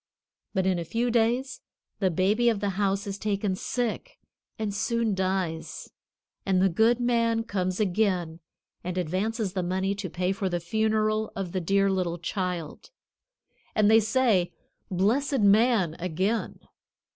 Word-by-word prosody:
But 190 -1 +1
in 185 -2 +1
a - - -2
few 235 +8 -1
days 245 +3 +1 0.4
the 190 -3 +2
baby 205 +8 +2
of 220 -3 0
the 200 0 -1
house 195 0 0
is 200 0 -5
taken 205 -2 -1
sick 245 - -3 0.4
and 215 -2 -2
soon 230 +1 0
dies, 185 -4 -2 0.5
and 190 -2 +2
the 190 +1 +4
good 225 +7 +3
man 230 -2 +1
comes 185 -3 -2
again 185 -5 0 0.4
and 180 +1 -4
advances 190 +4 -1
money 190 +2 0
to 200 -2 -5
pay 180 +3 -1
for 195 0 -2
the 175 -1 -1
funeral 215 +3 0
of 195 -3 -4
the 185 - -2
dear 195 +3 +2
little 180 -3 -1
child; 175 - -4 0.9
and 210 0 +4
they 225 - +7
say, 220 -5 +2 0.4
"Blessed 230 +9 +1
man!" 205 -4 +4
again. 185 +6 -2
200 Hz, 145 wpm, -27 LUFS, 185-220 Hz, 0.9 s, they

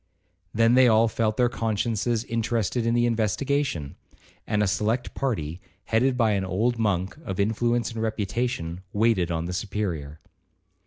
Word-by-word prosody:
Then 115 +3 +3
they 130 0 +6
all 115 0 +5
felt 110 -1 -1
their 125 - +4
consciences 115 0 -1
interested 115 0 -1
in 115 - +2
the 120 0 +3
investigation; 115 - -1 0.5
and 105 -1 +1
a - - +2
select 105 +5 -1
party, 90 - -2 0.2
headed 125 +3 +1
by 115 -3 +3
an 100 -2 0
old 110 +6 0
monk 95 -4 0
of 95 - -5
influence 120 +4 +1
and 115 -1 -5
reputation, 110 -5 -2
waited 105 -5 +2
on 85 -1 -2
the 90 - -4
Superior. 90 -7 -3
110 Hz, 150 wpm, -25 LUFS, 95-120 Hz, 0.5 s, they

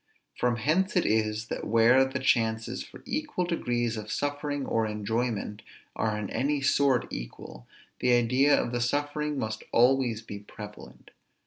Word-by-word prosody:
From 120 -1 +1
hence 160 - +1
it 180 - +3
is, 110 0 +1
that - - -4
where 115 +4 +5
the 130 +1 -3
chances 115 -4 +1
for - - -14
equal 295 -11 -2
degrees 120 -9 -1
of 105 0 -6
suffering 145 0 -2
or 115 -1 0
enjoyment 105 0 -2 0.3
are 110 -1 0
in 105 -1 -3
any 145 +2 0
sort 135 -2 +3
equal, - - -8 0.3
the 125 0 +3
idea 125 +4 +4
of - - -2
the 120 -1 -1
suffering 145 +3 -1
must 110 -3 -3
always 120 -2 +3
be 105 -2 -7
prevalent. 105 - -11
120 Hz, 150 wpm, -28 LUFS, 110-140 Hz, 0.3 s, where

